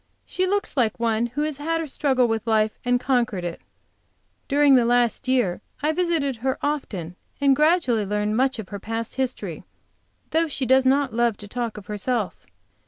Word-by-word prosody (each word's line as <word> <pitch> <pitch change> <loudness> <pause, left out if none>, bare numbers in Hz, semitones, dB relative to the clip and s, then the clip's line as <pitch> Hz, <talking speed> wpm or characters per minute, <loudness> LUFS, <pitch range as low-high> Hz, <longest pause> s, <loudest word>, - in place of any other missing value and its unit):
She 370 0 -1
looks 405 -2 -1
like 235 -6 +1
one 230 0 +1
who 255 +5 -3
has 305 -2 -3
had 330 +3 -1
her 325 - -2
struggle 265 -3 +1
with 225 0 -2
life 215 -1 +1
and 245 0 +2
conquered 245 -8 0
it. 170 -1 -5 0.9
During 285 0 +4
last 245 +1 +2
year 245 -9 +1 0.2
I 305 - +3
visited 315 -6 0
her 260 +3 -1
often 200 - -3 0.2
and 280 -1 +4
gradually 300 -7 +3
learned 210 +1 0
much 265 +2 +1
of 220 -4 -7
her 200 - -6
past 225 +2 -4
history, 240 - -3 0.7
though 325 +1 +2
she 275 -3 -3
does 260 +1 +4
not 270 -2 +2
love 235 -2 +1
to 205 - -9
talk 235 0 -4
of 205 - -9
herself. 210 0 -3
245 Hz, 175 wpm, -24 LUFS, 220-280 Hz, 0.9 s, During